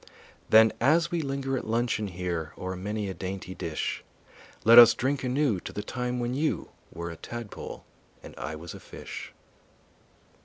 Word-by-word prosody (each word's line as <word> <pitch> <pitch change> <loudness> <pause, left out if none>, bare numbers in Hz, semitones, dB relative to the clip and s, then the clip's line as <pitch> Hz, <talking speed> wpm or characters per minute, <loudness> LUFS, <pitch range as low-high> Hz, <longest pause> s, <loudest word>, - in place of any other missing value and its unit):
Then 110 0 +7
as 165 +7 +4
we 170 -1 0
linger 135 -2 -2
at - - -9
luncheon 115 -2 0
here 85 -3 -4
O'er 95 0 -4
many 105 +3 -3
a 95 - -3
dainty 95 0 -5
dish, 80 -4 -3 0.6
Let 115 +2 +10
us 120 -1 +9
drink 135 +1 -1
anew 130 -5 +1
to - - -8
the 105 - -5
time 125 0 -3
when 120 +1 -1
you 150 +4 -1 0.2
Were 85 0 -5
a - - -8
tadpole 120 +5 -8 0.4
and - - -10
I 80 +4 -5
was 80 +2 -8
a - - -9
fish. - - -9
110 Hz, 165 wpm, -28 LUFS, 95-130 Hz, 0.6 s, Let